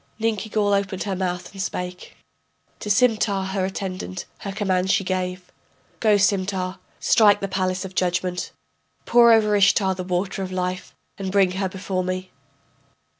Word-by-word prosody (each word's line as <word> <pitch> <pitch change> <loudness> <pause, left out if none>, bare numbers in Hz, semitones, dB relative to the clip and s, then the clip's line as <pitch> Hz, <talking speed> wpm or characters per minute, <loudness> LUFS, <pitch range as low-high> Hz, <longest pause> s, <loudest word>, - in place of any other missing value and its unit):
Ninkigal 215 -2 0
opened 200 -2 -1
her 195 -2 -2
mouth 180 -1 -3
and 195 -1 -6
spake, 180 -1 -5 0.6
To 210 - -6
Simtar, 205 -4 +2
her 190 -1 0
attendant, 185 -1 -5
her 200 - -5
command 190 -2 0
she 195 +1 +3
gave. 185 -1 -3 0.5
Go, 215 -2 +4
Simtar, 190 -2 0 0.2
strike 210 -2 +5
the 195 - -2
palace 185 0 -1
of 190 - -8
judgment, 180 0 -1 0.5
Pour 235 -1 +6
over 215 -2 +4
Ishtar 195 -1 +4
the 185 0 -5
water 185 +2 -2
of 185 -1 -4
life, 185 0 -3 0.2
and 190 -1 -3
bring 195 -2 +3
her 190 +1 -2
before 185 0 -3
me. 185 0 -4
190 Hz, 150 wpm, -23 LUFS, 185-200 Hz, 0.6 s, Pour